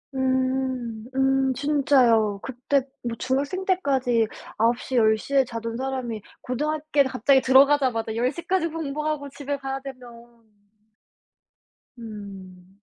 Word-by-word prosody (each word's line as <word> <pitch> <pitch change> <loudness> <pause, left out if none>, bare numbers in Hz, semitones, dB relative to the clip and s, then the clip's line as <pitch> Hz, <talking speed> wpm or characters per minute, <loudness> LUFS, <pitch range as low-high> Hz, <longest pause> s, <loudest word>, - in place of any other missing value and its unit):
음. 260 -3 -1
음 265 0 +2
진짜요. 250 -7 +3
그때 265 +2 0 0.2
뭐 235 -1 -3
중학생 280 +8 -1
때까지 260 - +1 0.3
9:00 240 +3 0
10:00 220 +4 +2
에 270 -2 +5
자던 230 -1 -5
사람이 255 -4 -3 0.2
고등학교에 300 +2 0
갑자기 265 +1 +3
들어가자마자 260 -4 +4
10:00 255 +8 -1
까지 370 -3 +1
공부하고 300 -2 -3
집에 285 0 -4
가야 270 0 -4
되면 270 -2 -8 2.0
음. 195 -4 -11
260 Hz, 220 characters per minute, -24 LUFS, 230-280 Hz, 2.0 s, 에